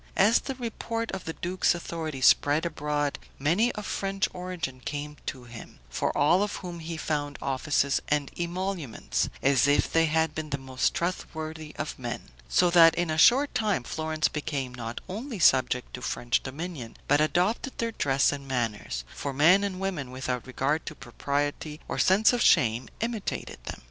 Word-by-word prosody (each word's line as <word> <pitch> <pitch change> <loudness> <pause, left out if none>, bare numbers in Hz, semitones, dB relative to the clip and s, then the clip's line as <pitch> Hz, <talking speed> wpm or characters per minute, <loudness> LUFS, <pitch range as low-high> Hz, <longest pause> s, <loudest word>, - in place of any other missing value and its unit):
As 210 +4 +5
the 270 - -5
report 230 -1 -4
of 190 -2 -5
the 165 - -3
duke's 180 +1 +1
authority 160 -5 -5
spread 145 +5 +4
abroad, 145 -3 -1 0.2
many 175 - +2
of 210 - -6
French 195 0 -1
origin 180 -7 -5
came 150 +2 -5
to 130 -2 -4
him, 120 -2 -11
for - - 0
all 170 +6 +4
of 205 0 -1
whom 175 -2 -7
he 165 0 -5
found 145 -2 -2
offices 140 +1 +1
and 145 -2 0
emoluments, 175 - -2
as 135 -1 +4
if 145 - +2
they 165 0 +4
had 160 0 +1
been 155 0 -5
the 140 - -1
most 130 -1 -1
trustworthy 160 -3 -4
of 150 -2 -5
men; 120 - -6 0.2
so 180 -1 +4
that 165 -2 +7
in 175 -2 0
a 155 - -1
short 270 - +6
time 210 - +1
Florence 155 +3 -1
became 140 -4 -3
not 115 -1 -5
only 225 +6 -5
subject 130 -6 +3
to 125 - -6
French 120 -1 0
dominion, 140 -3 -6
but 145 +2 +4
adopted 180 - +1
their 230 0 -1
dress 135 -9 +2
and 140 -1 -6
manners; 110 - -2
for 140 - -4
men 170 +8 +5
and 190 -2 -3
women, 180 -9 -3
without 130 -1 -4
regard 135 +4 0
to 155 - -5
propriety 145 +4 -3
or - - -3
sense 205 +5 +5
of 245 - 0
shame, 115 - +4
imitated 230 -3 -4
them. - - -6
155 Hz, 175 wpm, -27 LUFS, 135-180 Hz, 0.2 s, that